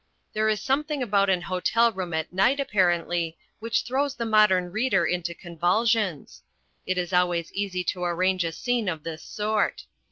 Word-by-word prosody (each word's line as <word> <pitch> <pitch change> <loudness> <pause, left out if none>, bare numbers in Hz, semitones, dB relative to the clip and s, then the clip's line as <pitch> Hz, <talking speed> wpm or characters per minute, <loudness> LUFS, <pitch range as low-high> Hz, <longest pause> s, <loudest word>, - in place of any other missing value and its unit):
There 215 0 +1
is 215 -1 +1
something 285 +3 -1
about 200 -3 +2
an 180 -2 +1
hotel 195 +6 +2
room 185 -4 -5
at 160 +1 -3
night, 195 +10 +3
apparently, 175 -7 0 0.2
which 230 +1 -1
throws 275 +2 -1
the 235 - -3
modern 210 -5 +3
reader 220 -4 +1
into 175 0 -2
convulsions. 180 +1 0 0.5
It 185 - 0
is 180 0 -2
always 175 -2 +1
easy 195 -2 -2
to 180 +1 -2
arrange 180 +1 +1
a 165 - -2
scene 240 +3 -1
of 160 -4 -5
this 160 -1 -6
sort. 210 0 -1
190 Hz, 165 wpm, -25 LUFS, 175-220 Hz, 0.5 s, night